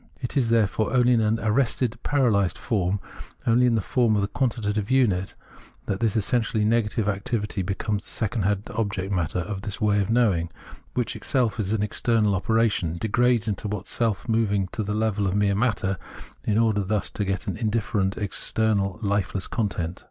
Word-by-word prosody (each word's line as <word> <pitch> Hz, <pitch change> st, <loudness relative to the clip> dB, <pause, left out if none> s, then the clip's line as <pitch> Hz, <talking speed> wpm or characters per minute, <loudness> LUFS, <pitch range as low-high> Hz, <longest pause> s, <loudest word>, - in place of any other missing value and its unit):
It 125 Hz, -, -5 dB
is 125 Hz, -5 st, +2 dB
therefore 110 Hz, 0 st, +1 dB
only 125 Hz, 0 st, +5 dB
in 115 Hz, -, +3 dB
an 110 Hz, +1 st, +1 dB
arrested, 115 Hz, +1 st, 0 dB
paralysed 115 Hz, -10 st, +2 dB
form, 100 Hz, -3 st, 0 dB, 0.5 s
only 120 Hz, +2 st, +4 dB
in 120 Hz, -, +3 dB
the 110 Hz, -, +1 dB
form 120 Hz, -5 st, +2 dB
of 100 Hz, -, +1 dB
the -, -, 0 dB
quantitative 110 Hz, -5 st, -1 dB
unit, 105 Hz, -9 st, +2 dB, 0.5 s
that 95 Hz, -, -2 dB
this 110 Hz, -3 st, +1 dB
essentially 110 Hz, 0 st, +1 dB
negative 110 Hz, -1 st, +1 dB
activity 105 Hz, 0 st, -2 dB
becomes 100 Hz, +2 st, -2 dB
the -, -, -13 dB
second 105 Hz, -3 st, -1 dB
object 100 Hz, -3 st, -2 dB
matter 90 Hz, -3 st, -1 dB
of 95 Hz, +2 st, -5 dB
this 105 Hz, -1 st, -5 dB
way 105 Hz, -2 st, +2 dB
of 100 Hz, -, -2 dB
knowing, 105 Hz, -8 st, +2 dB, 0.5 s
which, 125 Hz, -3 st, -1 dB
itself 120 Hz, -4 st, 0 dB
an 105 Hz, +1 st, 0 dB
external 105 Hz, 0 st, +1 dB
operation, 100 Hz, -4 st, +1 dB
degrades 115 Hz, +3 st, +2 dB, 0.2 s
what 105 Hz, -2 st, -3 dB
is -, -, -9 dB
self 115 Hz, -3 st, 0 dB
moving 105 Hz, -4 st, +1 dB
to 110 Hz, -, -4 dB
the 105 Hz, 0 st, -2 dB
level 105 Hz, -2 st, 0 dB
of 95 Hz, -, -1 dB
mere 100 Hz, -1 st, +2 dB
matter, 100 Hz, -4 st, 0 dB, 0.5 s
in 105 Hz, -, +1 dB
order 110 Hz, -3 st, +2 dB
thus 100 Hz, +1 st, -1 dB
to 105 Hz, -, -2 dB
get 95 Hz, -1 st, -2 dB
an -, -, -3 dB
indifferent, 110 Hz, -3 st, -1 dB
external, 105 Hz, -1 st, +1 dB
lifeless 100 Hz, -2 st, 0 dB
content. 90 Hz, -6 st, -2 dB
105 Hz, 175 wpm, -25 LUFS, 100-115 Hz, 0.5 s, only